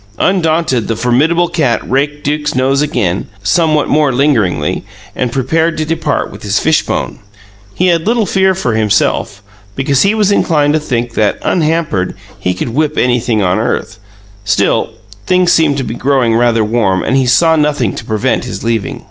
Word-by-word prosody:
Undaunted, 160 - +1
the 115 - -1
formidable 145 +10 +1
cat 145 -9 0
raked 145 +3 -1
Duke's 150 0 -2
nose 135 +2 +1
again, 105 -11 -1 0.2
somewhat 155 - +2
more 150 -2 +2
lingeringly, 125 -7 0 0.3
and 125 -2 -2
prepared 160 +6 0
to 155 - -1
depart 160 -2 -2
with - - -11
his 100 0 -1
fishbone. 160 +6 0 0.6
He 185 - +1
had 170 0 +1
little 230 -1 +2
fear 190 -1 +2
for 125 -11 -1
himself, 105 -2 0 0.3
because 135 0 +1
he 200 +2 +2
was 210 -2 +2
inclined 150 -7 +2
to 155 - +2
think 120 -5 -3
that, 105 -3 +1
unhampered, 155 - 0 0.2
he 90 0 -1
could 95 - -3
whip 150 +5 -1
anything 120 -3 +1
on 90 0 +1
earth; - - -3 0.4
still, 100 - 0 0.3
things 180 -1 +3
seemed 150 -4 +2
to 135 - -2
be 115 - -5
growing 130 -2 +1
rather 115 -1 +2
warm 105 -4 0
and 130 - 0
he 135 -2 +2
saw 160 +7 +4
nothing 150 -8 0
to - - -7
prevent 110 -2 -1
his - - -6
leaving. 115 -3 -2
140 Hz, 170 wpm, -13 LUFS, 115-160 Hz, 0.6 s, saw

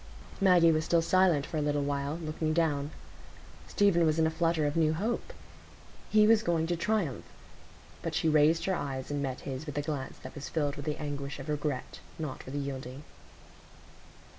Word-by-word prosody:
Maggie 180 -4 +6
was 155 0 +1
still 165 +1 +2
silent 175 -5 +3
for 160 - -4
a - - +1
little 145 -1 0
while, 140 +1 -2
looking 155 -1 -2
down. 150 -3 +1 0.8
Stephen 200 -4 +3
was 155 -1 +2
in 160 - +3
a 160 - +1
flutter 165 -1 +1
of 145 - -1
new 160 -1 +3
hope; 220 +8 -2 0.8
he 215 0 +5
was 220 0 +5
going 170 -6 +1
to 175 +1 0
triumph. 175 - -1 0.8
But - - -3
she - - +1
raised 155 +1 +4
her 190 - +1
eyes 135 -5 -4
and 145 -1 -1
met 130 -2 -3
his 135 +3 -6
with 145 -1 -5
a - - +2
glance 145 -3 -4
that 130 - -8
was 145 - -7
filled 145 -3 -1
with 145 - -7
the 150 - -2
anguish 140 -1 -4
of 140 +2 -8
regret, 145 -3 -3 0.2
not 150 -6 -6
with 130 - -6
yielding. 135 -1 -5
155 Hz, 190 wpm, -30 LUFS, 140-165 Hz, 0.8 s, Maggie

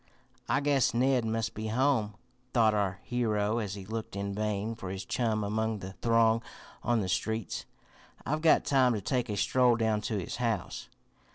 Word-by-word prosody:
"I - - +2
guess 140 -5 +2
Ned 125 -1 +2
must 115 0 -1
be 110 0 -4
home," 115 -3 +1 0.4
thought 110 -3 +5
our 100 -2 0
hero 110 -2 0
as 105 -3 -3
he 100 -2 -8
looked 110 0 -5
in 100 0 -3
vain 105 +1 -2
for 95 -5 -7
his 95 +1 -5
chum 110 -3 0
among 110 +2 -1
the 95 -1 -8
throng 115 -1 +3 0.4
on 120 -1 +1
the 95 - -2
streets. 105 +2 -2 0.6
"I've 155 +2 -1
got 160 -1 +4
time 130 -4 +3
to 105 - -3
take 125 +2 -1
a 105 - -2
stroll 125 +2 +3
down 110 -2 +1
to 105 0 -2
his 90 - -4
house." - - -2
110 Hz, 180 wpm, -30 LUFS, 105-120 Hz, 0.6 s, thought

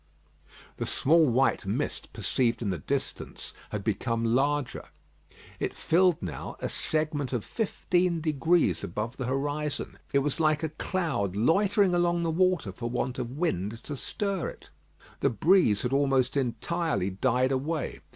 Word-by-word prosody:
'" - - -36 0.3
The - - -3
small 160 +2 +4
white 130 +2 +2
mist - - -2
perceived 120 -2 0
in 100 - 0
the 90 - -3
distance - - -4 0.2
had - - -4
become 115 -1 -1
larger. 135 +3 +1 0.7
It - - -2
filled 180 0 +3
now 85 -4 -5
a - - -3
segment 155 -4 -1
of 120 -4 -2
fifteen 180 -5 0
degrees 160 +2 +2
above 110 +8 -4
the 130 - -3
horizon. 145 +3 -2
It 140 -1 +3
was 145 - -1
like 155 -1 +2
a 160 - 0
cloud 155 - -2
loitering 195 - +3
along 175 -1 +2
the 165 - 0
water 180 - +2
for 120 +5 -5
want 125 +1 -2
of 125 +2 -4
wind 115 - -1
to 145 - -5
stir 195 +6 -2
it. - - -14 0.5
The - - +3
breeze 120 - +3
had 125 +1 -1
almost 135 -2 +2
entirely 125 - -1
died 125 +6 +1
away. 145 +4 -2
140 Hz, 150 wpm, -28 LUFS, 120-165 Hz, 0.7 s, small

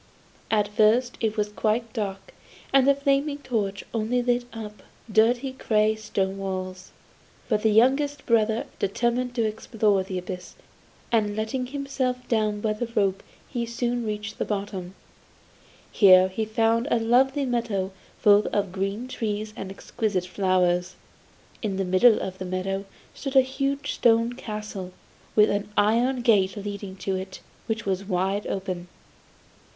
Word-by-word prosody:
At 210 -2 +2
first 220 +4 +3
it 220 -1 -1
was 210 0 0
quite 220 +2 -1
dark, 195 -4 -4 0.4
and 270 -1 +5
the 280 - +6
flaming 280 +1 +1
torch 205 -8 -2
only 235 +2 0
lit 245 0 +1
up 215 -2 -8 0.3
dirty 240 +5 +3
grey 215 -4 +2
stone 195 -3 -2
walls. 185 -1 -5 0.6
But 215 -3 +1
the 220 - +3
youngest 275 +6 +3
brother 225 -1 +2
determined 240 +5 0
to 235 - +1
explore 215 -2 +1
the 185 0 -4
abyss, 180 0 -7 0.6
and 210 -3 +2
letting 235 +4 -2
himself 260 -2 -3
down 215 -2 0
by 215 0 +1
the 230 +3 -3
rope 195 -2 +1 0.3
he 235 -3 -3
soon 240 +1 -1
reached 210 0 -4
the - - +1
bottom. 195 -3 -4 1.0
Here 185 -2 +7
he 220 +4 -2
found 225 +3 +1
a - - +3
lovely 265 +5 +3
meadow 230 -6 -1 0.3
full 205 0 +5
of 200 -3 -1
green 195 +6 -3
trees 215 -3 -3
and 195 - -6
exquisite 195 -1 -2
flowers. 180 -1 +1 0.7
In 200 -4 -2
the 195 - 0
middle 185 +5 +5
of 190 0 -5
the 185 - -4
meadow 190 +2 -2 0.3
stood 275 -1 -6
a 265 - +9
huge 275 +2 -2
stone 230 0 +3
castle, 210 -6 -6 0.4
with 210 0 +5
an 205 0 -2
iron 240 +4 +2
gate 195 -5 +3
leading 200 -1 -6
to 195 - 0
it, 190 0 -7 0.3
which 225 -1 -2
was 195 0 -1
wide 195 +1 -1
open. 185 -2 -4
215 Hz, 145 wpm, -25 LUFS, 195-240 Hz, 1.0 s, a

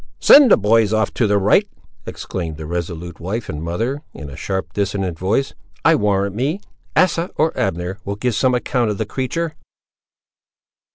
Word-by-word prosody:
"Send 280 -3 +8
the - - +7
boys 110 0 +3
off 110 -2 +1
to 115 - +1
the 105 0 +2
right," 100 +1 +3 0.4
exclaimed 80 -5 -5
the 80 - -7
resolute 85 0 -5
wife 100 +7 -4
and 75 -1 -5
mother, 115 - -2
in 75 -3 -8
a - - -9
sharp, 95 -4 -4
dissonant 95 -4 -2
voice; 105 +9 0 0.3
"I - - +6
warrant 100 -1 +1
me, 140 - -1 0.4
Asa, 180 -1 +2
or 160 +1 +1
Abner 90 -4 -2
will 100 - -4
give 120 +3 -1
some 125 +4 +2
account 120 -1 0
of 105 - -2
the 110 - -2
creature!" 150 +8 -3
105 Hz, 170 wpm, -19 LUFS, 90-125 Hz, 0.4 s, Send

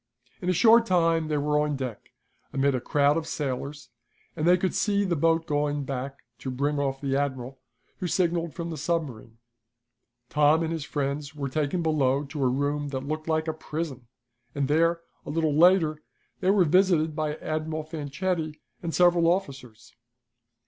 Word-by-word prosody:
In 180 - -1
a - - +4
short 230 +6 +5
time 165 -3 +2
they 150 -1 0
were 150 +1 +1
on 150 -1 0
deck, 130 -5 -6 0.4
amid 140 0 +1
a 125 - -1
crowd 145 +3 +2
of 160 -1 -3
sailors, 140 0 -4 0.5
and 160 0 -1
they 180 +1 +6
could 185 +1 -1
see 200 -1 +1
the 180 -3 0
boat 165 +1 +2
going 145 -2 0
back 135 0 -5 0.2
to 130 - -5
bring 140 +3 -1
off 135 -1 -2
the 135 -1 -1
admiral, 130 -2 -3 0.4
who 185 - -2
signaled 170 -2 0
from 170 -1 -4
the 160 - -5
submarine. 135 -9 -3 0.9
Tom 150 +3 +3
and 165 0 -2
his 160 -3 -4
friends 145 0 -3
were 140 -2 -3
taken 155 +5 -1
below 140 -3 +2
to 145 0 -4
a - - +4
room 145 +3 -1
that 135 -1 -4
looked 155 +1 -4
like 160 0 0
a 160 - 0
prison, 155 -5 -5 0.5
and 140 -1 0
there, 165 +3 +2 0.2
a - - -9
little 155 0 +1
later, 160 -1 +4 0.4
they 185 - +1
were 195 -2 +4
visited 165 -2 +3
by 155 -1 -1
Admiral 155 0 -3
Fanchetti 155 +1 -3 0.2
and 170 -2 -3
several 175 -1 +4
officers. 135 - -5
155 Hz, 175 wpm, -26 LUFS, 140-165 Hz, 0.9 s, they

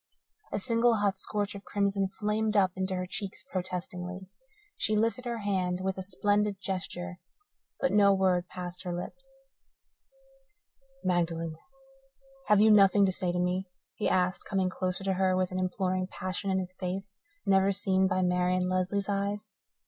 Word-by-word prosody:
a - - -1
single, 230 +2 +3
hot 200 -2 0
scorch 205 0 -2
of 200 0 -9
crimson 200 -1 0
flamed 210 +2 -1
up 190 -2 +4
into 190 0 -1
her 185 0 -2
cheeks 195 +1 -5
protestingly. 180 0 -4 0.5
She 215 - +1
lifted 230 +4 +1
her 235 -1 -2
hand 185 -4 -1
with 190 0 -1
a - - -2
splendid 205 +1 0
gesture, 180 -2 -4 0.6
but 270 - +1
no 200 -1 +6
word 185 -2 +2
passed 180 0 -6
her 180 -1 -4
lips. 270 +9 -9 1.7
"Magdalen, 165 -2 0 0.9
have 210 -1 +5
you 215 +1 +7
nothing 200 -1 +6
to 190 - +2
say 180 -1 -1
to 175 - -2
me?" 180 +1 0 0.2
he 215 - 0
asked, 180 0 +1
coming 190 -2 0
closer 185 0 -2
to 195 0 +1
her 185 0 +2
with 185 -1 0
an 185 - -2
imploring 185 0 0
passion 185 +1 -3
in 190 - +2
his 185 -1 -3
face 190 +2 -4 0.3
never 195 0 +4
seen 190 -1 +2
by 185 -1 +1
Marian 180 0 +2
Lesley's 185 +2 0
eyes. 200 +1 -1
190 Hz, 160 wpm, -29 LUFS, 185-205 Hz, 1.7 s, you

